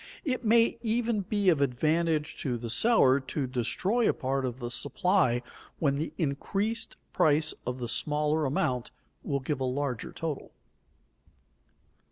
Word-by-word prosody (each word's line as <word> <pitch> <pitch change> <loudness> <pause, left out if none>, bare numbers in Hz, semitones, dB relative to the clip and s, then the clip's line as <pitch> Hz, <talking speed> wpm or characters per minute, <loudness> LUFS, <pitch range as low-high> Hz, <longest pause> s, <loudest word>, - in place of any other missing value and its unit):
It 255 -4 -1
may 230 +1 +3
even 230 -1 0
be 200 0 +1
of 155 -5 +3
advantage 155 +4 0
to 125 -4 -1
the 115 -1 -4
seller 140 - +5
to 135 +1 -3
destroy 135 - 0
a - - +3
part 135 0 -1
of 125 0 -4
the 120 -1 -4
supply, 130 0 +1 0.3
when 140 -3 +1
the 155 +3 -3
increased 195 +9 -2 0.2
price 155 +1 +3
of 125 0 -2
the 120 -2 -4
smaller 150 +4 +1
amount 125 -3 -1 0.3
will 140 -1 -2
give 140 +1 -2
a - - -1
larger 130 -2 -2
total. 160 -4 -5
150 Hz, 145 wpm, -29 LUFS, 130-190 Hz, 0.3 s, seller